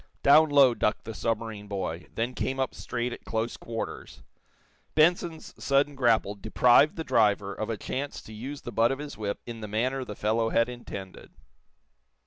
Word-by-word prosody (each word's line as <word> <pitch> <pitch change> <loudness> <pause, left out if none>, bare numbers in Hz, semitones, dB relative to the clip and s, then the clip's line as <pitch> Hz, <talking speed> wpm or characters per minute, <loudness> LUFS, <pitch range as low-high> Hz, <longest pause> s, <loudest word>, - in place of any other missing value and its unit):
Down 155 +3 +7
low 140 -3 +6
ducked 105 - 0
the 115 - -6
submarine 110 -2 -3
boy; 90 -4 -4
then 120 +3 -1
came 135 +1 -2
up 130 - -1
straight 120 0 -3
at - - -10
close 115 +1 -2
quarters. 115 -1 -6 0.7
Benson's 165 0 +2
sudden 140 +1 +2
grapple 115 -6 +2
deprived 120 +7 +4
the 160 - -4
driver 105 -6 +2
of 110 - -4
a 115 - -2
chance 140 +7 -4
to 110 - -11
use 135 +6 -7
the 120 - -7
butt 115 +2 +3
of 135 - -2
his 145 0 -7
whip 105 -2 -3
in 115 -2 -7
the 105 - -5
manner 125 +6 -1
the 105 -4 -7
fellow 115 +2 +1
had 115 +1 +2
intended. 100 -6 -8
115 Hz, 175 wpm, -27 LUFS, 110-135 Hz, 0.7 s, Down